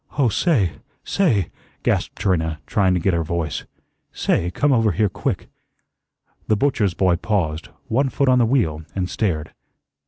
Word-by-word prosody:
"Oh, 135 Hz, -5 st, +4 dB
say 110 Hz, -, +2 dB, 0.3 s
say," 115 Hz, -, +1 dB, 0.3 s
gasped -, -, 0 dB
Trina, 80 Hz, -5 st, 0 dB
trying 95 Hz, -3 st, +2 dB
to -, -, +1 dB
get 95 Hz, +2 st, +1 dB
her 85 Hz, -1 st, +1 dB
voice, 80 Hz, -2 st, -3 dB, 0.5 s
"say, 85 Hz, -, 0 dB
come 140 Hz, +10 st, +2 dB
over 115 Hz, -5 st, +3 dB
here 105 Hz, +4 st, +2 dB
quick." -, -, -3 dB, 1.0 s
The 110 Hz, -, +2 dB
butcher's 105 Hz, -8 st, +1 dB
boy 90 Hz, -2 st, +2 dB
paused, 85 Hz, -6 st, -1 dB, 0.2 s
one 135 Hz, +4 st, +1 dB
foot 140 Hz, +1 st, 0 dB
on 130 Hz, -1 st, +5 dB
the 120 Hz, -, +4 dB
wheel, 100 Hz, -, +1 dB
and 95 Hz, -2 st, -1 dB
stared. 80 Hz, -7 st, -2 dB
95 Hz, 155 wpm, -21 LUFS, 85-120 Hz, 1.0 s, on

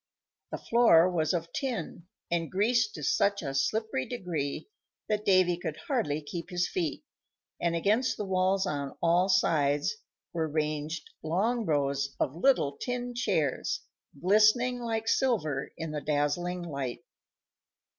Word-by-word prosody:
The -, -, -4 dB
floor 230 Hz, -8 st, +5 dB
was 160 Hz, -3 st, +1 dB
of 170 Hz, -2 st, -3 dB
tin, 210 Hz, -, -4 dB, 0.2 s
and 165 Hz, -1 st, 0 dB
greased 215 Hz, +3 st, +2 dB
to 150 Hz, -, -7 dB
such 200 Hz, +6 st, +2 dB
a 135 Hz, -2 st, -3 dB
slippery 135 Hz, 0 st, 0 dB
degree 170 Hz, -, -3 dB, 0.4 s
that 210 Hz, -1 st, -1 dB
Davy 185 Hz, -3 st, +4 dB
could 175 Hz, -, -5 dB
hardly 155 Hz, -, 0 dB
keep 170 Hz, +3 st, -6 dB
his 180 Hz, -1 st, 0 dB
feet, 165 Hz, -6 st, -2 dB, 0.6 s
and 170 Hz, -1 st, +1 dB
against 215 Hz, +9 st, +1 dB
the 210 Hz, -, -3 dB
walls 190 Hz, +1 st, +1 dB
on 145 Hz, -6 st, -3 dB
all 175 Hz, +3 st, +3 dB
sides 150 Hz, -, +2 dB, 0.4 s
were 165 Hz, -2 st, 0 dB
ranged 155 Hz, +1 st, -2 dB
long 210 Hz, +8 st, 0 dB
rows 140 Hz, -2 st, 0 dB
of 135 Hz, -, 0 dB
little 165 Hz, -, +2 dB
tin 245 Hz, 0 st, -3 dB
chairs 190 Hz, -, 0 dB, 0.4 s
glistening 215 Hz, -, +4 dB
like 225 Hz, -2 st, -2 dB
silver 170 Hz, -, +1 dB
in 165 Hz, -1 st, -4 dB
the 150 Hz, -1 st, -3 dB
dazzling 165 Hz, +5 st, -1 dB
light. 140 Hz, -7 st, -4 dB
175 Hz, 135 wpm, -29 LUFS, 150-215 Hz, 0.6 s, floor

